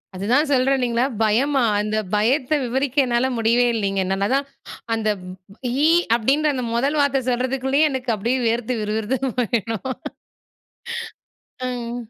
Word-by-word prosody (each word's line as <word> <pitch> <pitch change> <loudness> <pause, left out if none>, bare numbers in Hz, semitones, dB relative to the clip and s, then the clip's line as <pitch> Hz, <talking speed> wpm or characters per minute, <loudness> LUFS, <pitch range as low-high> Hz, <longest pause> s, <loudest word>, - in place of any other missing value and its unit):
அதுதான் 245 +11 +1
சொல்றேன் 270 +1 +3
இல்லைங்களா, 240 0 +1 0.2
பயமா? 260 +6 +2 0.2
அந்த 215 +1 -2 0.2
பயத்த 255 +7 +1
விவரிக்க 265 +3 -2
என்னால 240 +1 +1
முடியவே 235 +2 +3
இல்லைங்க. 195 -3 0
நா 195 - +1
நான் - - +3
அதான் 275 +2 0 0.2
ஹா - - -8 0.2
அந்த 215 -1 -1 0.7
"இ" - - +5 0.3
அப்படீன்ற 280 +6 +2
அந்த 250 -2 -2
1 280 +5 +1
வார்த்தை 275 -1 +2
சொல்றதுக்குள்ளேயே 265 +4 +1
எனக்கு 255 -3 -1
அப்படியே 235 +6 0
வேர்த்து 235 +2 -1
விறு 210 0 -2
விறுத்து 260 +5 -1
போயிடும். 225 -1 -1 1.8
ம். 240 -1 -4
245 Hz, 140 wpm, -22 LUFS, 225-270 Hz, 1.8 s, இ